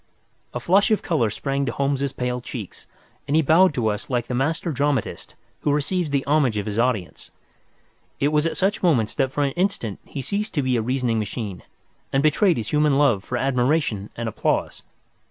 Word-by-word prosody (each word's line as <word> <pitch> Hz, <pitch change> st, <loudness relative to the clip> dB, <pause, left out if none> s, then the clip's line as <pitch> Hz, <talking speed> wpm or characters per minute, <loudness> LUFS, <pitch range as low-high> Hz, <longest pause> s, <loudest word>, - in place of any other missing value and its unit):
A 120 Hz, -, -4 dB
flush 190 Hz, +10 st, +3 dB
of 215 Hz, -, +1 dB
colour 150 Hz, -, +1 dB
sprang 135 Hz, +6 st, -2 dB
to -, -, 0 dB
Holmes's 140 Hz, 0 st, -1 dB
pale 125 Hz, -1 st, -3 dB
cheeks, 115 Hz, -5 st, -8 dB, 0.4 s
and 145 Hz, -, +1 dB
he 160 Hz, -, +4 dB
bowed 170 Hz, +6 st, +5 dB
to 120 Hz, -3 st, 0 dB
us 105 Hz, -1 st, -4 dB
like 120 Hz, -2 st, 0 dB
the -, -, -5 dB
master 155 Hz, +7 st, 0 dB
dramatist 140 Hz, -4 st, -2 dB, 0.2 s
who 145 Hz, -, 0 dB
receives 155 Hz, +4 st, 0 dB
the 140 Hz, -1 st, 0 dB
homage 140 Hz, -6 st, +2 dB
of 100 Hz, -, -2 dB
his 105 Hz, +1 st, -2 dB
audience. 115 Hz, -7 st, -1 dB, 0.9 s
It 140 Hz, -, +2 dB
was 150 Hz, +1 st, +2 dB
at -, -, -3 dB
such 195 Hz, +2 st, +1 dB
moments 130 Hz, -, +2 dB
that 130 Hz, -1 st, 0 dB
for 145 Hz, -, 0 dB
an 140 Hz, -, +1 dB
instant 175 Hz, -, -2 dB
he 140 Hz, -, -6 dB
ceased 210 Hz, +4 st, -2 dB
to 145 Hz, -, +1 dB
be 130 Hz, -1 st, +1 dB
a 115 Hz, -, +1 dB
reasoning 125 Hz, -1 st, 0 dB
machine, 105 Hz, -3 st, -4 dB, 0.5 s
and 135 Hz, +1 st, +1 dB
betrayed 165 Hz, +4 st, +3 dB
his 115 Hz, -2 st, -4 dB
human 150 Hz, -2 st, +3 dB
love 125 Hz, -10 st, +3 dB
for 125 Hz, -, -3 dB
admiration 125 Hz, -4 st, 0 dB
and 115 Hz, -1 st, -4 dB
applause. 110 Hz, -, -1 dB
135 Hz, 195 wpm, -23 LUFS, 120-150 Hz, 0.9 s, bowed